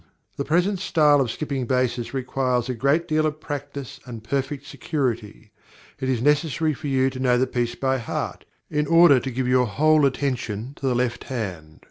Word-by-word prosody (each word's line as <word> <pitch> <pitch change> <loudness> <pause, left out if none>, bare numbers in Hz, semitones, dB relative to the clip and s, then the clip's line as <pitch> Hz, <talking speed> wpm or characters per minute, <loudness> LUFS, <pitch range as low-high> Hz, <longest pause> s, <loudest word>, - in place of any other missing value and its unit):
_" - - -30 0.3
The 140 - -2
present 180 +5 +1
style 150 -6 +4
of 125 - 0
skipping 135 -1 -3
basses 125 -2 0
requires 130 -2 -1
a - - 0
great 140 +8 +1
deal 155 -1 +2
of 155 0 -4
practice 145 -3 -6
and 115 -4 -9
perfect 140 +4 -2
security; 115 -9 -3 0.5
it 130 - -2
is 125 -3 0
necessary 150 +1 +2
for 140 +2 -7
you 135 -1 +2
to 130 - -7
know 125 -1 +3
the 130 - +3
piece 120 -2 -2
by 130 0 0
heart, 115 - -4 0.2
in 150 -1 -1
order 165 -5 +7
to 135 - -4
give 130 0 -2
your 125 -1 +3
whole 150 +6 +4
attention 125 -3 -3
to 135 - -3
the 125 - +1
left 120 -1 -1
hand. 90 - -5
130 Hz, 190 wpm, -23 LUFS, 125-145 Hz, 0.5 s, order